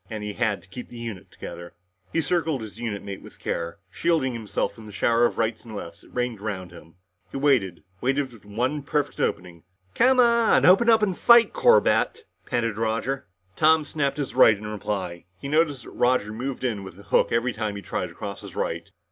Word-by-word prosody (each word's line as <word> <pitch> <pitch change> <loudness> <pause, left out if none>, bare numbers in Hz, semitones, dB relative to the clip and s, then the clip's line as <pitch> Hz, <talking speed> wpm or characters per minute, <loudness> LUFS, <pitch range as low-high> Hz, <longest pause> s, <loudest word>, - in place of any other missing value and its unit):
And 110 -2 -5
he 105 0 -4
had 110 -2 -1
to - - -19
keep 120 +7 -9
the 120 - -10
unit 115 -5 -7
together. 85 0 -9 0.4
He 165 - +1
circled 160 -4 0
his 110 +1 -10
unit 110 -4 -4
mate 100 -1 -7
with - - -14
care, 85 0 -3
shielding 155 - +1
himself 110 -3 -2
from 110 -2 -12
the - - -9
shower 115 +3 +3
of - - -1
rights 110 -1 -1
and 110 -2 -9
lefts 85 -4 -8
that - - -19
rained 125 -4 -2
around 95 -4 -4
him. 85 -1 -14 0.3
He - - -6
waited 125 - +2 0.2
waited 135 +1 0
for 115 - -13
the 105 - -21
one 125 +8 -1
perfect 145 +1 -2
opening. 85 -1 -2 0.3
"Come 255 +1 +4
on! 235 -2 +5
Open 195 +6 +6
up 225 -1 +5
and 190 -4 +1
fight, 235 +3 +6
Corbett," 480 -1 +3 0.2
panted 115 -4 -1
Roger. 115 +5 -1 0.3
Tom 160 0 +4
snapped 140 -2 -1
his 145 -2 -3
right 110 -4 +6
in 105 - -9
reply. 100 -5 -4
He 140 - -6
noticed 145 -3 +1
that - - -11
Roger 120 -4 +1
moved 130 +3 -4
in 110 -6 -1
with 95 -1 -10
a - - -12
hook - - +2
every 115 +2 +1
time 105 -2 -3
he 100 - -7
tried - - -3
to - - -14
cross - - -6
his - - -10
right. - - -3
120 Hz, 215 wpm, -25 LUFS, 105-145 Hz, 0.4 s, Open